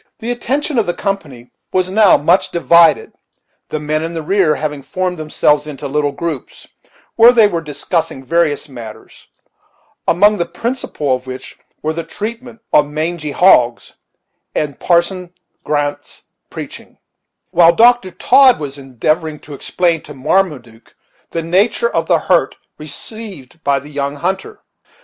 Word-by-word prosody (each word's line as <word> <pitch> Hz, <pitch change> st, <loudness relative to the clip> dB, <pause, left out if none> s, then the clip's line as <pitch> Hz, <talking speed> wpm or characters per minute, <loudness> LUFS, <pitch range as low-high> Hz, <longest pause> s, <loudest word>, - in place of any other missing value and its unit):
The 235 Hz, +2 st, -4 dB
attention 270 Hz, +3 st, -1 dB
of 220 Hz, -, 0 dB
the 175 Hz, -, -1 dB
company 150 Hz, -, -5 dB, 0.2 s
was 185 Hz, 0 st, 0 dB
now 210 Hz, -1 st, +5 dB
much 145 Hz, 0 st, +2 dB
divided, 170 Hz, -1 st, +4 dB, 0.6 s
the 155 Hz, -, -3 dB
men 155 Hz, +1 st, -2 dB
in 165 Hz, +1 st, -5 dB
the 160 Hz, -, -4 dB
rear 180 Hz, -2 st, +2 dB
having 150 Hz, -2 st, -4 dB
formed 185 Hz, +4 st, -3 dB
themselves 150 Hz, -1 st, +1 dB
into 145 Hz, -3 st, -6 dB
little 145 Hz, +1 st, 0 dB
groups, 160 Hz, -4 st, -6 dB, 0.5 s
where 230 Hz, +1 st, +8 dB
they 230 Hz, -3 st, +5 dB
were 170 Hz, -5 st, -2 dB
discussing 150 Hz, -1 st, -3 dB
various 155 Hz, 0 st, 0 dB
matters; 115 Hz, -5 st, -12 dB, 0.8 s
among 205 Hz, +3 st, +4 dB
the 170 Hz, -, -1 dB
principal 200 Hz, -, -3 dB
of 130 Hz, 0 st, -10 dB
which 130 Hz, 0 st, -8 dB, 0.3 s
were 155 Hz, +1 st, -1 dB
the 165 Hz, +1 st, -4 dB
treatment 230 Hz, +4 st, -7 dB
of 145 Hz, -, +5 dB
mangy 155 Hz, +1 st, -3 dB
hogs 125 Hz, -9 st, +3 dB, 0.6 s
and 150 Hz, -3 st, -2 dB
Parson 175 Hz, +1 st, 0 dB, 0.3 s
Grant's 145 Hz, -1 st, -3 dB, 0.3 s
preaching; -, -, -9 dB, 0.5 s
while 170 Hz, 0 st, +6 dB
Dr. 235 Hz, +1 st, +4 dB
Todd 260 Hz, +6 st, +4 dB
was 145 Hz, -2 st, -6 dB
endeavoring 150 Hz, +4 st, -2 dB
to 150 Hz, -, -11 dB
explain 165 Hz, +3 st, 0 dB
to 150 Hz, -, -12 dB
Marmaduke 130 Hz, -7 st, -2 dB, 0.3 s
the 165 Hz, -, -3 dB
nature 200 Hz, -, +1 dB
of -, -, 0 dB
the -, -, +4 dB
hurt -, -, +1 dB, 0.2 s
received 165 Hz, -, -10 dB
by 140 Hz, -1 st, +2 dB
the 140 Hz, +2 st, -8 dB
young 140 Hz, -1 st, -3 dB
hunter. 190 Hz, -, -4 dB
165 Hz, 145 wpm, -16 LUFS, 145-190 Hz, 0.8 s, where